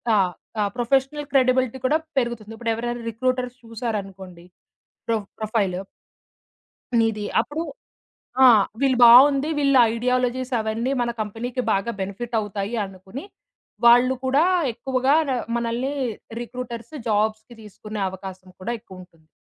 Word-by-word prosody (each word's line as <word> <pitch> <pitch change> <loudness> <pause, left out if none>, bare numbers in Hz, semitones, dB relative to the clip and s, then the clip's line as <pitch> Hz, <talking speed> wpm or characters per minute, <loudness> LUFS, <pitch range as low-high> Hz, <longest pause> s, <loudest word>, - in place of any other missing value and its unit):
ఆహ్, 185 -3 +2 0.3
ఆ - - +3
professional 270 +4 0
credibility 255 -1 +3
కూడా 310 +3 +2 0.2
పెరుగుతుంది. 230 -3 -4
ఇప్పుడు 230 -1 -1
ఎవరైనా 240 +1 -4
రిక్రూటర్స్ 255 +1 -2
చూసారనుకోండి 195 -6 -6 0.6
ప్రో 230 - +2 0.2
ప్రొఫైల్ 215 -4 0 1.2
నీది 220 -2 +1 0.2
అప్పుడు 305 +3 -4 0.8
ఆ! - - +10 0.3
"వీళ్ళు 265 -3 +2
బావుంది. 275 +5 +7
వీళ్ళ 275 -1 +3 0.2
ఐడియాలజీస్ 250 +1 0
అవన్నీ 220 +4 -1
మన 240 0 0
కంపెనీకి 235 +4 -4
బాగా 195 +4 0
బెనిఫిట్ 210 +5 -4
అవుతాయి" 205 +1 -4
అనుకుని, 190 - -9 0.6
వాళ్ళు 245 +2 +6
కూడా 275 +5 +3 0.3
ఎక్కువగా 265 +3 +1
ర - - +1 0.3
మనల్ని 235 +4 -2 0.5
రిక్రూటర్స్ 240 +1 -7 0.2
జాబ్స్‌కి 215 +2 -1
తీసుకునే 210 0 -8
అవకాశం 185 0 -9
కూడా 200 +6 -4
ఎక్కువుంటుంది. 180 -6 -15
235 Hz, 115 wpm, -23 LUFS, 210-255 Hz, 1.2 s, ఆ